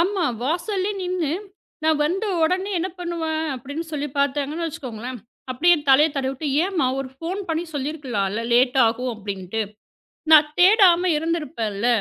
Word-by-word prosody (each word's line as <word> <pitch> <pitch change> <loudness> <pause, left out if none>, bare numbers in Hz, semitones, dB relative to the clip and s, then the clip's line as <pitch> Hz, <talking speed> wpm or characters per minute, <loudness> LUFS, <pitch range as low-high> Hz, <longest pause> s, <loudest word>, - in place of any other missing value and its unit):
ஆமா. 370 +1 +1 0.2
வாசல்லே 370 - -1
நின்னு, 360 -5 -1 0.5
நான் 315 -1 +2
வந்த 370 +8 -1 0.2
உடனே 370 +5 +1
என்ன 365 - -1
பண்ணுவேன்? 325 -2 -2
அப்படின்னு 285 +6 -6
சொல்லிப் 290 -2 -4
பாத்தாங்கன்னு 285 +4 0
வச்சுக்கோங்களேன், 255 -6 -6 0.3
அப்படியே 335 +8 +4
தலைய 280 +4 +6
தடவி 265 -1 -1
விட்டு, 270 +3 -6 0.2
ஏம்மா! 370 -8 0
ஒரு 270 - -5
ஃபோன் 345 +7 -4
பண்ணி 325 +1 -1
சொல்லியிருக்கலான்ல, 255 -8 -2
லேட்டாகும் 250 0 +3
அப்படின்னுட்டு. 200 0 -4 0.7
நான் 300 -1 +8
தேடாம 365 -2 +6
இருந்திருப்பேன் 300 -9 -2
இல்ல. 210 +5 -1
300 Hz, 135 wpm, -22 LUFS, 255-345 Hz, 0.7 s, நான்